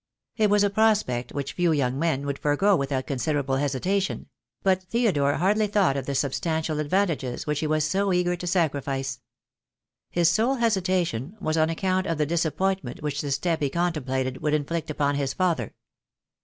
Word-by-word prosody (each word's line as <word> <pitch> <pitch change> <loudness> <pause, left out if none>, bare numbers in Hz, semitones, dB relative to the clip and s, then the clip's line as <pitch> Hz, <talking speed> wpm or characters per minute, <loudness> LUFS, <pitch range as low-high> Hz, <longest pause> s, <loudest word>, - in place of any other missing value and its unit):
It 215 -2 +2
was 205 0 +4
a 200 - +2
prospect 210 - +1
which 140 -1 -4
few 175 -2 +2
young 135 -3 0
men 145 -4 0
would 140 -1 -3
forego 190 +8 +3
with 140 -4 -2
out 130 -1 -1
considerable 135 0 -1
hesitation; 180 +9 -1 0.3
but 190 -1 +3
Theodore 185 -9 +1
hardly 210 +4 +2
thought 195 -8 +2
of 135 -2 -3
the 140 - -2
substantial 155 +3 -1
advantages 150 -5 -1
which 150 -1 -1
he 155 - -1
was 155 0 +1
so 195 +4 +1
eager 180 0 +1
to 175 0 -6
sacrifice. 140 -6 -1 0.9
His 170 -1 +2
sole 230 +10 +2
hesitation 185 - 0
was 155 -5 -1
on 160 0 +3
account 185 +3 0
of 165 - -1
the 150 - +1
dis 170 +2 0
appointment 185 -5 -2
which 150 0 -2
the 145 - -4
step 165 +4 0
he 140 - +1
contemplated 135 -6 -1
would 150 0 +1
in 145 -2 -1
flict 165 +1 -3
upon 145 -1 0
his 135 -1 -2
father. 170 - 0
160 Hz, 185 wpm, -25 LUFS, 140-185 Hz, 0.9 s, was